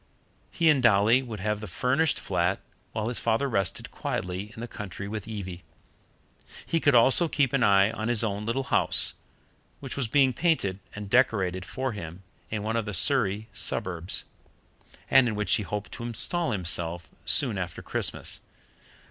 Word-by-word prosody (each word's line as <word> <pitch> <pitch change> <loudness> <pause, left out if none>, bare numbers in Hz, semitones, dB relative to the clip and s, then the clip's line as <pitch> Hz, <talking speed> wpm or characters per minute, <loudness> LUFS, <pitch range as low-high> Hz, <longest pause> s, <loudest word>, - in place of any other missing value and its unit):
He 165 - 0
and 140 -3 +2
Dolly 115 +2 +4
would 115 -6 -7
have 105 +1 -1
the 105 - -7
furnished 135 +9 +1
flat - - 0 0.3
while 110 -1 -3
his 120 - 0
father 115 +5 +1
rested 100 -8 -1
quietly 95 +4 -4
in - - -10
the 120 - -5
country 100 -3 -7
with 105 0 -6
Evie. 95 -5 -6 1.0
He 165 - 0
could 145 -4 +3
also 130 +8 +5
keep 140 -5 +1
an 135 -2 +2
eye 100 0 +5
on 110 0 -4
his 120 -2 0
own 105 -1 -2
little 115 +5 -1
house, - - +2 0.7
which 135 -2 -5
was 140 -4 0
being 135 +2 +3
painted 120 - 0 0.2
and 105 0 -6
decorated 95 -6 +1
for 130 +5 -3
him 90 -3 -8 0.3
in 105 -2 -3
one 110 +2 -1
of 115 - -1
the 105 -2 -3
Surrey 110 - +1
suburbs, 90 -1 +1 0.8
and 135 -2 +5
in 110 - -2
which 105 -3 0
he - - +2
hoped 105 0 -5
to - - -7
install 160 +9 -2
himself 85 -3 +1 0.2
soon - - +3
after - - -5
Christmas. - - -2
110 Hz, 170 wpm, -27 LUFS, 100-130 Hz, 1.0 s, also